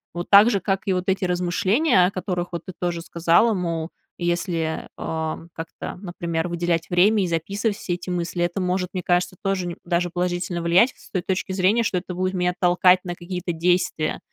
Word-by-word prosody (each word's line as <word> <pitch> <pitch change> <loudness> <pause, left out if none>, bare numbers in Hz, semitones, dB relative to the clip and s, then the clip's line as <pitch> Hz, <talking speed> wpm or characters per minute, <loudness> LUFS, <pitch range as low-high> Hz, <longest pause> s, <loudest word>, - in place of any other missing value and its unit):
вот 175 0 -4
так 205 +3 +9
же, 200 - +1
как 195 +1 -1
и 195 - +1
вот 180 0 -2
эти 190 +1 0
размышления, 185 - +2
о - - -3
которых, 180 -2 -3
вот, 170 -1 -4
ты - - -6
тоже 175 -1 -2
сказала, 170 +7 +3
мол, 170 -3 -2 0.3
если, 170 -2 -2
э, 160 -1 -3 0.2
как-то, 165 0 -7
например, 170 -3 -3
выделять 170 -1 -1
время 195 +4 +4
и - - 0
записывать 200 +6 -1
все 180 - -3
эти 175 +1 -6
мысли, 175 0 -1
это 175 +2 -1
может, 180 0 -1
мне 185 - -2
кажется, 180 +1 +1
тоже 195 -2 0
ни 170 - -5
даже 175 0 0
положительно 175 0 -2
влиять, 175 +9 +4
с - - -18
той 185 - -1
точки 190 +1 -2
зрения, 195 +5 +3
что 200 - 0
это 180 +1 -8
будет 185 +1 -1
меня 180 -1 0
толкать 180 +1 +4
на 175 -1 -4
какие-то 175 0 -4
действия. 175 -1 0
180 Hz, 195 wpm, -23 LUFS, 175-185 Hz, 0.3 s, так